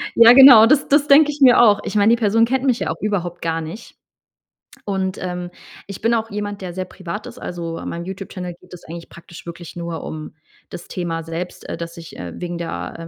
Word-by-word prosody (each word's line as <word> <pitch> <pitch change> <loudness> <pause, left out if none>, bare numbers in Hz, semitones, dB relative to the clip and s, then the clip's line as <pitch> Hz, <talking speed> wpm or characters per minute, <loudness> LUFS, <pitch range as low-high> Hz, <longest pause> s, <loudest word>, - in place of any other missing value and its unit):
Ja 230 0 +8
genau, 250 -4 +9
das 290 +3 +2
das 290 +1 +3
denke 295 +1 +6
ich 290 0 -11
mir 255 -2 +7
auch. 210 -3 +4
Ich - - -5
meine, 210 +2 +4
die - - -8
Person 225 +1 +3
kennt 260 +2 -1
mich 250 -3 +1
ja - - -3
auch - - -8
überhaupt 180 -4 -3
gar 165 0 -2
nicht. 165 +9 -10 0.9
Und, 190 -2 -2
ähm, 180 -1 -5 0.4
ich 200 - -9
bin 230 +1 +1
auch 225 -1 -2
jemand, 205 -1 -5
der 180 -2 -6
sehr 185 0 -4
privat 190 +3 -8
ist, - - -11
also, 170 -2 -6
an - - -6
meinem 170 0 -6
YouTube 190 +1 -7
Channel 180 -2 -7
geht - - -18
es 175 - -11
eigentlich 170 +1 -10
praktisch 170 0 -14
wirklich 170 0 -9
nur 170 -1 -5
um 155 -1 -8 0.4
das 175 - -10
Thema 165 -2 -4
selbst, 165 +2 -7
äh, - - -3
dass 170 0 -8
ich, 165 -1 -11
äh, 90 -1 -7
wegen 175 -1 -5
der, 165 -1 -6
185 Hz, 230 wpm, -20 LUFS, 170-225 Hz, 0.9 s, genau